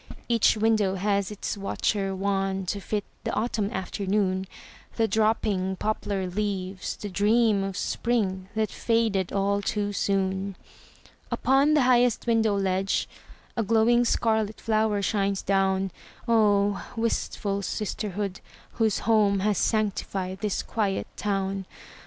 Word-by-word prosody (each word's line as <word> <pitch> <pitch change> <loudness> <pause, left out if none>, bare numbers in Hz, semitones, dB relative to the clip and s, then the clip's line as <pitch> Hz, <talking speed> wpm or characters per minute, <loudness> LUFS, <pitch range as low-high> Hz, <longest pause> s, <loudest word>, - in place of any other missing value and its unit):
Each 230 -2 +3
window 215 -3 +2
has 200 0 0
its 210 -1 -4
watcher 195 0 -1
wan 195 0 -1
To 200 +3 -2
fit 205 +1 -2 0.2
the - - -2
autumn 215 -2 0
afternoon, 190 -1 -1 0.5
The 225 -1 +2
dropping 215 -4 +1
poplar 200 -1 -2
leaves, 190 -1 -3
the 210 - -6
dream 205 +1 +3
Of 195 -1 -4
spring 195 -6 -1
that 220 -1 0
faded 225 -5 0
all 200 +1 +1
too 205 0 -1
soon. 195 0 -1 0.7
Upon 275 +3 +3
the 295 - +4
highest 245 -2 +3
window 225 -3 +2
ledge 195 0 0 0.5
A 230 - +1
glowing 230 +2 +4
scarlet 220 -2 +1
flower 215 -2 +1
shines 200 -1 0
down. 195 -1 +1 0.4
Oh, 205 -3 +3
wistful 205 -3 -1
sisterhood, 200 -1 -3 0.3
whose 220 -3 +1
home 210 -3 +3
Has 205 -1 +1
sanctified 195 -3 -1
this 210 -2 -1
quiet 205 -4 -1
town! 195 -1 -2
205 Hz, 120 wpm, -26 LUFS, 195-220 Hz, 0.7 s, the